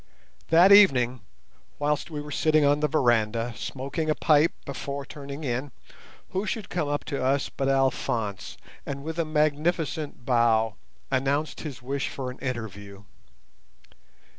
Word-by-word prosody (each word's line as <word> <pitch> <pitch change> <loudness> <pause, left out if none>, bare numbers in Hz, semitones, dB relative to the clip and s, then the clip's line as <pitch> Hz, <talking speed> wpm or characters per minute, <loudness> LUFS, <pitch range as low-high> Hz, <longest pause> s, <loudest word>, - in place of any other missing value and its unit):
That 175 +4 +7
evening, 130 -12 +6 0.6
whilst 150 +2 -1
we 150 -2 -5
were 150 0 -9
sitting 155 0 +3
on 145 +1 +3
the 150 - +2
veranda, 120 -4 +1
smoking 140 +7 -4
a 155 - +2
pipe 155 +1 +4
before 140 +1 -5
turning 140 +1 -8
in, 130 +1 -2 0.6
who 195 +3 -2
should 210 +1 -3
come 165 -5 -1
up 145 0 -2
to 140 -4 -3
us 135 +2 +1
but 135 0 -2
Alphonse, 120 -6 -1 0.3
and, 140 0 -6
with 160 +2 -5
a 165 - +1
magnificent 155 -2 -1
bow, 115 -3 +3 0.4
announce 140 +3 0
his 135 -6 -7
wish 135 +2 -2
for 130 -2 -5
an 125 - -12
interview. 100 -6 -6
140 Hz, 140 wpm, -26 LUFS, 125-155 Hz, 0.6 s, That